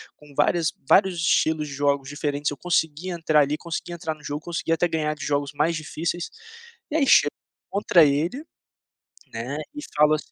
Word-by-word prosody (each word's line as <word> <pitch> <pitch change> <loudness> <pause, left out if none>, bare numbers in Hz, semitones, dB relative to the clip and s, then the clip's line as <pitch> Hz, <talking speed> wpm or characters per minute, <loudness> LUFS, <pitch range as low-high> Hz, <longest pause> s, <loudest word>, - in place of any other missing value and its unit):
com 150 -1 -17
várias 160 +3 +2 0.2
vários 190 -2 +5
estilos 160 -2 +2
de 140 - -7
jogos 140 -1 0
diferentes, 145 0 -2
eu 145 - -6
consegui 165 +1 0
entrar 160 -3 +3
ali, 145 +1 0
consegui 170 +1 -5
entrar 160 -2 -3
no 150 - -20
jogo, 145 +1 -4
consegui 170 -1 -3
até 170 +2 +2
ganhar 155 -2 -1
de 150 - -7
jogos 145 0 -1
mais 155 +3 +1
difíceis, 165 +2 -3 0.6
e - - -2
aí 280 -3 +2
chegou 145 -10 +6 0.4
contra 195 -4 +4
ele, 160 - 0 0.9
né, 120 +6 -4 0.2
e 295 - -5
falo 150 0 +5
assim 155 - -8
155 Hz, 180 wpm, -24 LUFS, 145-170 Hz, 0.9 s, chegou